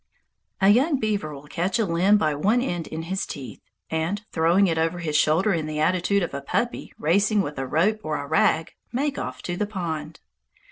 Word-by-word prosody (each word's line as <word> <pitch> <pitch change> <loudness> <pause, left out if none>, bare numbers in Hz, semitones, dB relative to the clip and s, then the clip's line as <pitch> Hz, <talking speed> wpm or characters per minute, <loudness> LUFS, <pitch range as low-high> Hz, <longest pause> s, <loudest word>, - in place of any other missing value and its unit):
A 195 - +6
young 265 +7 +4
beaver 205 -9 -1
will 140 0 -10
catch 175 +7 -1
a 225 - +1
limb 185 +4 +3
by 155 -6 +1
one 205 +12 +2
end 175 -10 -2
in 160 +1 -5
his 190 +3 -2
teeth, 135 -3 -8 0.3
and, 165 +6 -1
throwing 170 +4 +3
it 165 -3 +1
over 165 +2 0
his 160 -3 -3
shoulder 165 +7 +3
in 160 -2 -1
the 155 0 -3
attitude 185 +4 +2
of 170 - -4
a 140 - -4
puppy 235 +12 -2
racing 200 +6 +2
with 145 -4 -5
a 135 - -3
rope 195 +10 +2
or 155 -1 -2
a 145 - -5
rag, 160 +1 +2 0.2
make 280 +3 -1
off 130 0 -6
to 175 - -3
the 210 +3 -1
pond. 165 -6 -5
170 Hz, 205 wpm, -24 LUFS, 155-205 Hz, 0.3 s, A